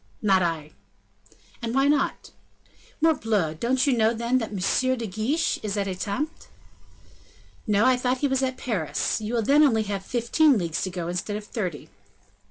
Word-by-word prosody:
"Not 195 -3 +4
I." 160 -3 -2 0.9
"And 230 +1 -3
why 270 +1 +4
not?" 290 -1 0 0.7
"Morbleu! 215 - +1
don't 255 +2 +1
you 275 -3 +3
know, 225 0 +2
then, 235 +3 +1
that 225 - -4
M. 255 +6 0
de 235 - -4
Guiche 225 - -1
is 210 -1 -3
at 200 -1 -1
Etampes?" 200 - -4 1.2
"No, 210 +1 +3
I 255 -1 +4
thought 250 +1 0
he 285 - +1
was 265 -1 0
at 260 -1 -1
Paris. 205 - -2
You 220 +3 -3
will 230 - +1
then 285 +7 +4
only 230 -7 +4
have 200 -2 -4
fifteen 250 +6 +2
leagues 170 -2 -2
to 185 - -2
go, 175 -2 -5
instead 180 +4 -3
of 210 - -7
thirty." 180 - -5
225 Hz, 175 wpm, -25 LUFS, 195-255 Hz, 1.2 s, Not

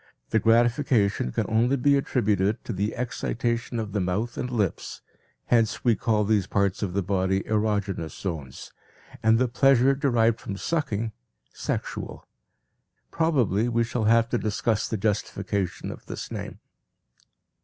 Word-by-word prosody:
The 110 - +3
gratification 115 - +2
can - - -1
only 115 +4 +2
be 140 +2 +3
attributed 105 -6 +1
to 115 - -3
the 100 +3 -2
excitation 120 0 -2
of 110 -2 -4
the 105 - -1
mouth 100 +7 -1
and 125 - -3
lips, 105 -8 -2 0.4
hence 110 -3 +1
we 120 -2 +5
call 105 +1 +1
these 105 -2 +1
parts 100 -1 0
of 95 -4 -2
the 100 0 0
body 95 0 0
erogenous 105 -6 -1
zones 80 -9 -6 0.5
and 110 +1 +4
the 130 +2 +2
pleasure 135 +1 +4
derived 120 -5 +2
from 100 - -6
sucking, 115 -7 -1 0.4
sexual. - - -4 0.8
Probably 120 - +1
we 115 0 +2
shall 115 -1 -2
have 115 +1 +4
to 120 - 0
discuss 110 0 0
the 110 - -2
justification 100 -2 -2
of - - -11
this - - -6
name. - - -6
110 Hz, 145 wpm, -26 LUFS, 100-120 Hz, 0.8 s, we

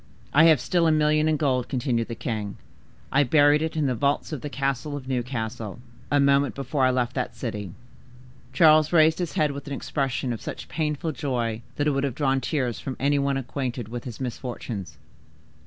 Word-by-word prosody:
"'I 155 +3 +7
have 160 -4 +6
still 170 +3 +1
a - - +4
million 155 0 +3
in 155 - +2
gold,' 130 -4 0
continued 125 -4 0
the 115 - -5
king. 110 -4 -4 0.5
'I 140 +2 +4
buried 145 +2 +5
it 160 0 -2
in 155 - +1
the 130 - +1
vaults 140 +7 0
of 150 -5 -4
the 145 - -5
castle 140 +1 -2
of 130 -2 -9
Newcastle, 115 -5 -3 0.3
a 145 - +4
moment 140 0 +3
before 135 0 0
I - - +4
left 125 -1 0
that 125 -2 -3
city.'" 105 -7 -5 0.8
Charles 155 -2 +5
raised 160 -1 +5
his 175 -3 -2
head 150 -2 +2
with 140 0 -8
an 140 - -4
expression 135 -3 -2
of 115 - -7
such - - -6
painful 155 0 -2
joy 120 -6 -2
that 145 - 0
it 150 - +3
would 135 0 0
have 135 -4 -1
drawn 135 -2 +1
tears 130 -4 -1
from 130 - -5
any 140 +1 +2
one 140 0 +1
acquainted 125 -3 -4
with 120 0 -6
his 120 -4 -7
misfortunes. 120 -5 -5
135 Hz, 200 wpm, -25 LUFS, 125-150 Hz, 0.8 s, I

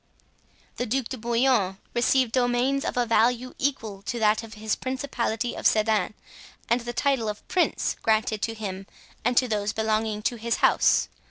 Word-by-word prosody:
The 245 - -2
Duc 255 +1 -1
de 260 - -5
Bouillon 235 -4 +2 0.2
received 245 0 +2
domains 255 +3 +1
of - - -3
a 245 - +3
value 235 +2 +2
equal 225 -8 -2
to 235 +4 -4
that 215 -1 +3
of 225 -1 -10
his 215 0 -1
principality 245 -3 -2
of - - +2
Sedan, 215 -2 +1 0.5
and 235 +1 +2
the 240 +1 -5
title 250 -3 +1
of 210 - -7
prince, 360 - +1
granted 220 -1 +1
to 225 - -2
him 195 -3 -6 0.4
and 245 +1 +1
to 255 - +4
those 210 -2 -1
belonging 220 -1 -1
to 240 +1 0
his 230 +1 -1
house. - - +3
230 Hz, 170 wpm, -26 LUFS, 215-250 Hz, 0.5 s, to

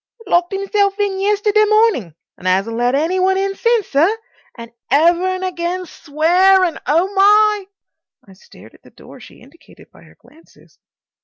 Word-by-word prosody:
"Locked 350 +1 0
himself 395 +1 -1
in 400 -2 -2
yesterday 415 +1 +1
morning 425 - +1 0.2
and 185 - -8
'asn't 195 +5 0
let 245 +2 0
any 330 +6 -1
one 380 +1 +1
in 390 0 -2
since, 465 0 0
sir. 330 +11 +1 0.4
And 235 0 -11 0.2
ever 340 +7 +2
and 370 0 -3
again 360 0 -4
SWEARING. 350 +4 +1
Oh, 345 +6 0
my!" 415 +1 +3 0.6
I 195 - -16
stared 185 - -18
at - - -22
the - - -19
door - - -16
she - - -16
indicated 335 -1 -20
by - - -20
her - - -21
glances. 320 +2 -24
370 Hz, 160 wpm, -17 LUFS, 315-400 Hz, 0.6 s, my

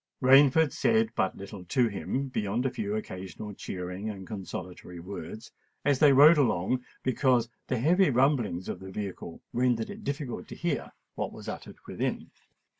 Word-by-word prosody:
Rainford 135 +3 +6
said 225 - +2
but 95 - 0
little 100 -1 -8
to 120 +7 +2
him, 130 +6 -3
beyond 110 +1 -1
a 130 - +1
few 210 -1 -3
occasional 105 - -6
cheering 90 +2 -5
and 95 -3 -7
consolatory 90 -3 -7
words, 95 +3 -8 0.3
as 145 -2 +3
they 150 -2 +7
rode 150 +4 +8
along, 125 -1 +1 0.2
because 125 -2 +2 0.2
the 130 - 0
heavy 175 +9 +4
rumbling 125 - +1
of - - -4
the 95 - -9
vehicle 95 -4 -6
rendered 120 -2 +1
it 210 +2 -9
difficult 140 -5 -4
to - - -8
hear 165 -6 -2 0.2
what - - -3
was - - -11
uttered - - -7
within. - - -3
120 Hz, 160 wpm, -28 LUFS, 95-140 Hz, 0.3 s, rode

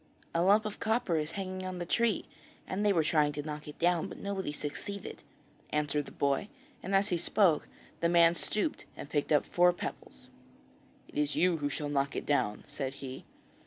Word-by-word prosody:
'A 170 - +2
lump 205 +4 +5
of 210 - -5
copper 220 -6 +1
is 155 +1 -2
hanging 185 0 -4
on 185 -1 -4
the 175 - -3
tree 230 +3 +1 0.4
and 190 +3 -2
they 205 - +4
were 165 -5 +3
trying 155 -2 +3
to 145 0 -4
knock 150 0 -6
it 150 - -9
down, 175 -1 +2
but - - -9
nobody 195 -5 -3
succeeded,' 165 +7 -6 0.5
answered 150 -1 0
the - - -9
boy; 140 +7 0 0.3
and 195 +2 -1
as 200 +2 +3
he 175 - +1
spoke, 175 -2 +3 0.3
the 170 - +2
man 170 -1 +6
stooped 215 - -2
and 145 - -8
picked 145 0 0
up 150 - +4
four 180 0 +4
pebbles. 65 - -7 0.8
'It - - -4
is 150 0 +1
you 180 -1 +3
who 145 -2 -1
shall 145 +1 -3
knock 140 -1 0
it - - -3
down,' 105 -8 +1
said 140 -2 -4
he. 135 -1 -8
165 Hz, 200 wpm, -31 LUFS, 145-185 Hz, 0.8 s, man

